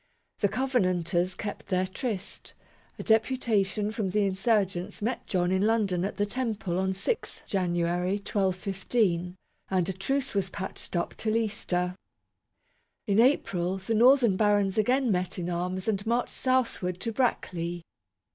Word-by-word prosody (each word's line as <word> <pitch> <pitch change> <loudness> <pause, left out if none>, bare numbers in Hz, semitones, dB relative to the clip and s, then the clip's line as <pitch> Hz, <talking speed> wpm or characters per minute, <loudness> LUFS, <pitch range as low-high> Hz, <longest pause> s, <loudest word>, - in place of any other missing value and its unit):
The 205 - +3
covenanters 185 -9 +1
kept 205 - -6
their 185 0 +1
tryst; 200 +1 -5 0.4
a - - -6
deputation 220 -3 +1
from 215 -3 -2
the 210 +2 +1
insurgents 195 -2 0
met 225 +4 -3
John 180 -1 +1
in 190 0 +2
London 205 -5 +2
at 200 - -2
the 205 +1 +1
Temple 210 -6 -2
on 190 0 +1
6 195 - -3
January, 175 -1 0
1215; 190 -2 0 0.3
and 185 -1 +1
a - - -1
truce 270 +9 -1
was 195 -2 0
patched 190 -1 -5
up 170 - -1
till 220 0 +1
Easter. 180 -5 -1 1.1
In 205 -1 +2
April, 190 -8 +2
the 190 +4 -3
northern 240 -3 +5
barons 205 -2 +2
again 245 +3 +2
met 180 0 -1
in 180 0 -3
arms 180 +2 -2
and 205 -2 0
marched 240 +1 +1
southward 235 -9 0
to 230 - -2
Brackley. 175 -8 -1
195 Hz, 140 wpm, -28 LUFS, 180-225 Hz, 1.1 s, northern